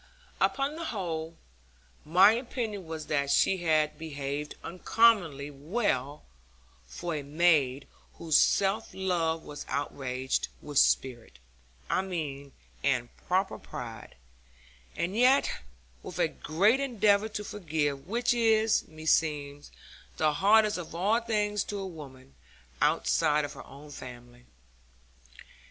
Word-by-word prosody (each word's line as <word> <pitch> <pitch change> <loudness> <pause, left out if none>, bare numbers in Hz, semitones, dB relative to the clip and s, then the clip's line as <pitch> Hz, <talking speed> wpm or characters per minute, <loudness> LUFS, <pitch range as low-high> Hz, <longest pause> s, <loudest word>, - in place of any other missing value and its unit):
Upon 275 +2 +1
the 335 - -5
whole, 165 - -4 0.7
my 185 +6 +6
opinion 225 -5 -4
was 160 -1 -6
that 140 -2 0
she 190 +6 +3
had 155 -3 +1
behaved 145 -1 -5
uncommonly 175 -6 +2
well 145 - -2 0.6
for 170 - -5
a 150 - -2
maid 145 -3 +2 0.3
whose 160 -3 -1
self 200 +3 +3
love 170 -4 -1
was 145 0 -8
outraged, 130 -2 -2
with 145 -2 0
spirit, 120 - +1 0.5
I - - +1
mean, 150 -7 -5 0.3
and 125 -4 0
proper 190 +2 0
pride; 115 -2 -8 0.8
and 180 +4 -2
yet 255 +4 +4 0.5
with - - -8
a - - +3
great 200 - +1
endeavour 220 -5 +2
to 210 -1 -5
forgive, 155 -8 -2
which 240 +4 +1
is, 225 -2 +2
meseems, 150 -2 -1 0.5
the 155 -1 +2
hardest 210 +4 +4
of 165 -1 -8
all 205 +7 +2
things 210 -3 0
to 205 - -5
a 195 - -4
woman, 135 -7 -11 0.5
outside 150 -2 +2
of - - -8
her - - -11
own 145 +2 -13
family. 120 -2 -11
160 Hz, 120 wpm, -29 LUFS, 145-205 Hz, 0.8 s, my